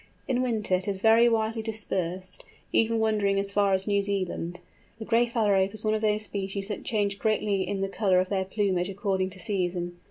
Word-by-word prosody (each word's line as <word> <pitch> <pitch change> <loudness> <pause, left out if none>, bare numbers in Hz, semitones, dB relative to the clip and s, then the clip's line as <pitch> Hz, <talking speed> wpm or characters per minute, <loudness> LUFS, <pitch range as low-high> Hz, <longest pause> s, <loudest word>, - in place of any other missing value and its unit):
In 255 -2 +1
winter 225 -6 -1
it 185 +1 +1
is 195 -2 -2
very 225 +3 +5
widely 225 0 0
dispersed, 185 -4 -3 0.3
even 230 0 +3
wandering 210 -3 +1
as 200 0 -1
far 200 0 +2
as 190 0 +1
New 200 -1 +2
Zealand. 185 -3 -3 0.4
The 220 - -7
Gray 235 +1 +3
Phalarope 205 -4 +1
is 215 - -3
one 215 - +2
of 215 - -1
those 215 0 +1
species 195 0 -4
that 210 - -4
change 205 -3 -1
greatly 210 -3 0
in 200 -1 -2
the 195 - 0
colour 195 -1 +1
of 185 0 -1
their 190 -2 0
plumage 190 -2 0
according 195 -1 -1
to 190 0 -13
season. 175 -4 -2
200 Hz, 200 wpm, -27 LUFS, 190-220 Hz, 0.4 s, very